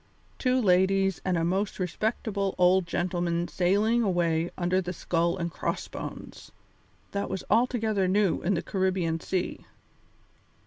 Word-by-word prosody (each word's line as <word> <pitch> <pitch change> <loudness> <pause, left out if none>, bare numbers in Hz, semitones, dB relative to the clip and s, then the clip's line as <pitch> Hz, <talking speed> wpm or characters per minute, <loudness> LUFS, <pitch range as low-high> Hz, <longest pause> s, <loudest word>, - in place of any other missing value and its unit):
Two 255 0 +2
ladies 195 -2 +3
and 185 -2 0
a 165 - 0
most 190 +4 -1
respectable 200 +1 -2
old 180 0 +4
gentleman 175 0 -1
sailing 205 +7 +2
away 170 -5 +1
under 185 +1 +1
the 180 0 -4
skull 170 +1 0
and 170 -2 -3
cross - - -3
bones! - - -8 0.6
That 200 0 -2
was 190 -1 -4
altogether 220 -4 +2
new 195 0 +2
in 195 +3 +1
the 170 - -2
Caribbean 185 -4 0
Sea. 185 +2 -3
185 Hz, 135 wpm, -27 LUFS, 175-200 Hz, 0.6 s, old